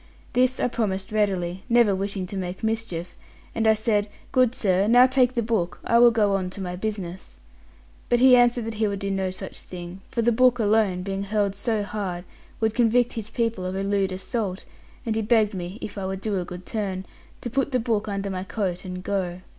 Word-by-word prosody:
This 255 Hz, +1 st, +2 dB
I -, -, +2 dB
promised 195 Hz, -5 st, -2 dB
readily, 190 Hz, -4 st, 0 dB
never 235 Hz, -4 st, +5 dB
wishing 195 Hz, 0 st, -2 dB
to 190 Hz, -, -7 dB
make 185 Hz, +1 st, -5 dB
mischief; 220 Hz, -6 st, -2 dB, 0.4 s
and 225 Hz, -1 st, +1 dB
I 220 Hz, -, +6 dB
said, 210 Hz, -1 st, 0 dB, 0.2 s
'Good 255 Hz, -1 st, +3 dB
sir, 195 Hz, -1 st, +2 dB
now 245 Hz, +3 st, +7 dB
take 255 Hz, -1 st, +2 dB
the 235 Hz, -, +1 dB
book; 215 Hz, -6 st, -1 dB
I 235 Hz, -, +3 dB
will 240 Hz, 0 st, +8 dB
go 215 Hz, -3 st, +2 dB
on 190 Hz, -2 st, 0 dB
to -, -, -6 dB
my 180 Hz, -2 st, -4 dB
business.' 190 Hz, -2 st, -5 dB, 0.7 s
But 240 Hz, -, +3 dB
he 255 Hz, 0 st, +8 dB
answered 240 Hz, -1 st, +3 dB
that 225 Hz, -, -4 dB
he 215 Hz, -, +4 dB
would 200 Hz, -1 st, -2 dB
do 195 Hz, 0 st, -3 dB
no 190 Hz, -1 st, 0 dB
such 185 Hz, -, -7 dB
thing; 180 Hz, +1 st, -9 dB
for 235 Hz, -, -1 dB
the 240 Hz, -, +4 dB
book 250 Hz, +1 st, +4 dB
alone, 210 Hz, -4 st, +2 dB
being 195 Hz, +1 st, -3 dB
hurled 200 Hz, -1 st, 0 dB
so 210 Hz, +1 st, -1 dB
hard, 195 Hz, -4 st, -4 dB, 0.3 s
would 220 Hz, -1 st, +1 dB
convict 240 Hz, +1 st, +3 dB
his 220 Hz, -2 st, -5 dB
people 230 Hz, -5 st, -1 dB
of 185 Hz, +1 st, -3 dB
a 195 Hz, -, -2 dB
lewd 195 Hz, -1 st, +1 dB
assault; 190 Hz, +1 st, -3 dB, 0.4 s
and 225 Hz, -2 st, -1 dB
he 225 Hz, -, +1 dB
begged 215 Hz, -1 st, +3 dB
me, 180 Hz, +1 st, -5 dB
if 200 Hz, 0 st, -5 dB
I 190 Hz, -, -3 dB
would 190 Hz, 0 st, -4 dB
do 205 Hz, -3 st, -1 dB
a 180 Hz, -, -3 dB
good 180 Hz, 0 st, -9 dB
turn, 195 Hz, -4 st, -3 dB, 0.4 s
to 240 Hz, -, -5 dB
put 270 Hz, +2 st, 0 dB
the 255 Hz, -, +2 dB
book 225 Hz, -3 st, -1 dB
under 200 Hz, -1 st, -3 dB
my 185 Hz, -1 st, -3 dB
coat 190 Hz, -3 st, -3 dB
and 180 Hz, -1 st, -6 dB
go. 185 Hz, -3 st, -2 dB
205 Hz, 220 wpm, -25 LUFS, 190-230 Hz, 0.7 s, will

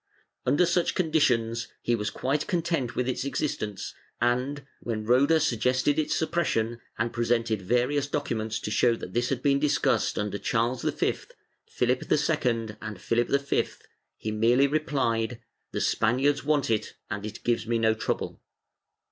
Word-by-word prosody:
"^ -, -, -57 dB, 0.4 s
Under 165 Hz, +5 st, +4 dB
such 175 Hz, 0 st, +1 dB
conditions, 120 Hz, -9 st, +1 dB, 0.2 s
he 120 Hz, -, +1 dB
was 105 Hz, -2 st, -2 dB
quite 140 Hz, +3 st, -1 dB
content 165 Hz, -8 st, -1 dB
with 125 Hz, -, 0 dB
its 130 Hz, -, -1 dB
existence 130 Hz, -7 st, -3 dB, 0.3 s
and, 125 Hz, +4 st, 0 dB
when 110 Hz, -2 st, -3 dB
Roda 135 Hz, +7 st, +4 dB
suggested 130 Hz, +1 st, +1 dB
its 155 Hz, -, 0 dB
suppression 120 Hz, -8 st, 0 dB, 0.2 s
and 120 Hz, +1 st, -1 dB
presented 115 Hz, -3 st, +1 dB
various 125 Hz, +8 st, +1 dB
documents 110 Hz, -7 st, -2 dB
to 105 Hz, -, -4 dB
show 115 Hz, +3 st, +3 dB
that 90 Hz, -5 st, -8 dB
this 120 Hz, 0 st, +1 dB
had 130 Hz, -2 st, -2 dB
been 140 Hz, -1 st, +3 dB
discussed 150 Hz, 0 st, +1 dB
under 105 Hz, -1 st, -2 dB
Charles 120 Hz, +5 st, 0 dB
V, -, -, +1 dB, 0.8 s
Phihp 125 Hz, -1 st, +1 dB
II 105 Hz, 0 st, -9 dB
and 105 Hz, -3 st, -6 dB
Philip 115 Hz, +4 st, +1 dB
V, 140 Hz, 0 st, +1 dB, 0.5 s
he 110 Hz, -, -4 dB
merely 115 Hz, +5 st, +4 dB
replied 130 Hz, -6 st, 0 dB, 0.2 s
" -, -, -51 dB
The -, -, -2 dB
Spaniards 135 Hz, +6 st, +2 dB
want 145 Hz, -4 st, +1 dB
it 110 Hz, -1 st, -1 dB, 0.2 s
and 105 Hz, -2 st, -3 dB
it 110 Hz, -, -7 dB
gives 120 Hz, -2 st, 0 dB
me 115 Hz, 0 st, +1 dB
no 110 Hz, -1 st, +3 dB
trouble." 110 Hz, -, -3 dB
120 Hz, 155 wpm, -27 LUFS, 115-140 Hz, 0.8 s, Under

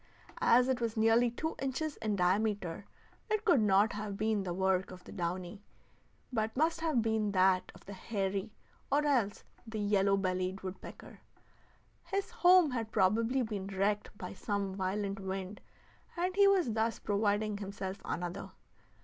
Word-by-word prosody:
As 245 Hz, +2 st, +5 dB
it 260 Hz, -2 st, 0 dB
was 230 Hz, -1 st, -2 dB
nearly 225 Hz, +2 st, +4 dB
two 315 Hz, +7 st, -4 dB
inches 275 Hz, +3 st, -2 dB
in 215 Hz, -2 st, -1 dB
diameter, 200 Hz, 0 st, 0 dB, 0.4 s
it 430 Hz, 0 st, 0 dB
could 345 Hz, -, +5 dB
not 205 Hz, +1 st, +4 dB
have 205 Hz, -1 st, -5 dB
been 215 Hz, -1 st, +1 dB
the 185 Hz, -2 st, -4 dB
work 190 Hz, +1 st, +1 dB
of 185 Hz, -1 st, -11 dB
the -, -, -12 dB
downy, 180 Hz, +2 st, -4 dB, 0.7 s
but 220 Hz, 0 st, -1 dB
must 325 Hz, +2 st, +1 dB
have 305 Hz, -8 st, +1 dB
been 220 Hz, -2 st, 0 dB
that 185 Hz, -1 st, +3 dB
of -, -, -16 dB
the 200 Hz, -, -8 dB
hairy, 195 Hz, +1 st, -3 dB, 0.4 s
or 295 Hz, +2 st, +3 dB
else 245 Hz, -9 st, +1 dB, 0.2 s
the 220 Hz, 0 st, -5 dB
yellow 200 Hz, -1 st, +2 dB
bellied 185 Hz, 0 st, -1 dB
woodpecker. 185 Hz, 0 st, -9 dB, 0.9 s
His 395 Hz, +3 st, -2 dB
home 365 Hz, -, +5 dB
had 225 Hz, -3 st, -3 dB
probably 225 Hz, +6 st, +2 dB
been 205 Hz, -4 st, -4 dB
wrecked 200 Hz, +2 st, 0 dB
by 180 Hz, -, -6 dB
some 200 Hz, 0 st, -2 dB
violent 195 Hz, +1 st, -2 dB
wind, 190 Hz, +1 st, -5 dB, 0.6 s
and 365 Hz, +2 st, -1 dB
he 400 Hz, 0 st, +6 dB
was 375 Hz, -10 st, +3 dB
thus 225 Hz, +1 st, 0 dB
providing 205 Hz, 0 st, 0 dB
himself 195 Hz, -1 st, -5 dB
another. 175 Hz, +3 st, -4 dB
210 Hz, 155 wpm, -32 LUFS, 190-235 Hz, 0.9 s, he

